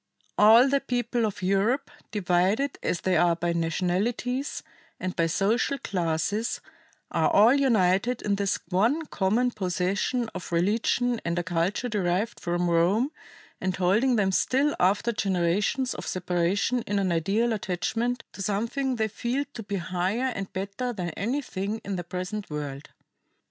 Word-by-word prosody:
"All 225 +5 +7
the 280 +1 +2
peoples 245 -2 -1
of 205 -3 -4
Europe, 210 +10 +1 0.2
divided 205 +7 +1
as 175 - -1
they 185 -1 +1
are 175 0 +4
by 170 0 -1
nationalities 190 - -1 0.4
and 185 0 -3
by 165 - +2
social 215 - +1
classes, 180 +3 -1 0.5
are - - +2
all 220 +5 +6
united 235 -4 +2
in 205 - +1
this 200 -1 0
one 230 - +2
common 230 +2 +1
possession 195 +4 -1
of 185 -1 -7
religion 225 +7 +1
and 170 +1 -2
a 175 - 0
culture 180 +7 -1
derived 205 0 -1
from 175 0 -1
Rome 180 - +2 0.5
and 185 -1 -1
holding 210 +8 +2
them 200 -3 +2
still 275 +9 +2
after 205 +6 +2
generations 200 +5 0
of - - -7
separation 185 +7 0
in 205 - 0
an 190 -2 +1
ideal 200 +8 +1
attachment 225 +5 -2
to - - -8
something 235 +7 -1
they 220 -2 0
feel 240 +6 -2
to 230 - -6
be 200 -1 -4
higher 185 +8 -1
and 195 -2 -5
better 200 +6 -3
than 180 -5 -4
anything 215 - -3
in 200 - -2
their 175 - -3
present 185 +4 -5
world." 145 -2 -5
200 Hz, 150 wpm, -26 LUFS, 180-240 Hz, 0.5 s, All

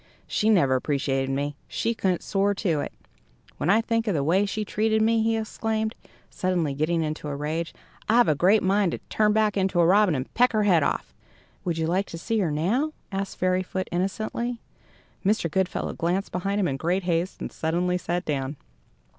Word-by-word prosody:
She 215 - +1
never 145 -11 +4
appreciated 135 0 0
me. 140 +1 -2
She 230 - -1
couldn't 185 -5 0
soar 200 0 +1
to 175 -7 0
it. - - -3 0.7
When 170 - -1
I 215 +4 +5
think 230 0 -1
of 200 - +1
the 140 - +1
way 185 +7 +2
she 210 +2 -3
treated 220 +1 +1
me," 225 +1 +3
he 225 0 +1
exclaimed, 220 0 -2 0.3
suddenly 175 -6 -1
getting 160 +4 0
into 155 0 -4
a 145 - -3
rage, 155 +3 -3 0.4
"I've 240 +2 +5
a 155 - +4
great 185 +9 +3
mind 195 -1 +2
to - - -2
turn 215 -1 +3
back 215 -1 +2
into 190 -2 +1
a 170 - +5
robin 195 -1 +4
and 130 0 -4
peck 250 0 +3
her 215 -1 +2
head 180 -6 +4
off!" - - -1 0.5
"Would 170 -2 -1
you 160 - 0
like 185 +4 0
to 165 - -7
see 225 +6 -1
her 180 -5 +1
now?" 215 - 0 0.2
asked 195 0 -3
Fairyfoot, 185 0 0
innocently. 215 +6 -2 0.6
Mr. 195 -5 +1
Goodfellow 190 +2 -1
glanced 180 +4 -1
behind 195 +3 -1
him 190 - +2
in 135 - -2
great 175 +6 0
haste, 175 +1 -1
and - - -5
suddenly 180 +3 0
sat 175 +1 -2
down. 140 -1 -2
185 Hz, 195 wpm, -25 LUFS, 160-215 Hz, 0.7 s, I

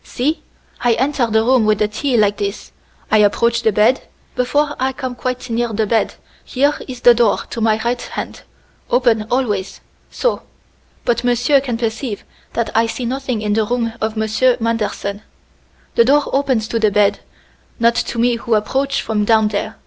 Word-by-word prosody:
"See! 300 +6 -2 0.4
I 240 -1 +4
enter 260 +1 0
the 220 0 +2
room 250 0 +3
with 215 -1 +3
the 210 +1 +1
tea 245 +4 -1
like 205 -1 +2
this. 200 0 -4 0.4
I 215 - +5
approach 235 +3 +2
the 220 - +2
bed. 215 +6 +3 0.3
Before 290 +4 0
I 265 +1 0
come 260 -2 -5
quite 255 +1 -4
near 235 0 0
the 220 +1 0
bed, 225 +2 0 0.3
here 285 +3 +1
is 250 -2 -8
the 245 - +7
door 235 -3 +2
to 230 - -4
my 220 -1 +2
right 240 +1 0
hand - - -6 0.5
open, 235 -3 +2
always 210 -7 -1 0.3
so! - - -1 0.6
But 240 0 +1
monsieur 245 +3 +3
can 245 -4 -3
perceive 225 -1 -3 0.3
that 235 -1 -1
I 225 +1 +3
see 245 +2 -4
nothing 255 -3 -3
in 210 -1 0
the 220 +1 +2
room 230 +1 -1
of 220 0 -2
Monsieur 220 +4 +2
Manderson. 215 -3 -2 0.7
The 235 - +4
door 290 +3 +4
opens 260 -5 +1
to 230 - -1
the 215 -1 +3
bed, 205 0 +2 0.6
not 235 0 +4
to 235 - -3
me 240 +1 +2
who 230 -1 0
approach 270 +6 0
from 215 -2 -1
down 220 0 +3
there. 210 +1 -3
235 Hz, 180 wpm, -18 LUFS, 220-255 Hz, 0.7 s, the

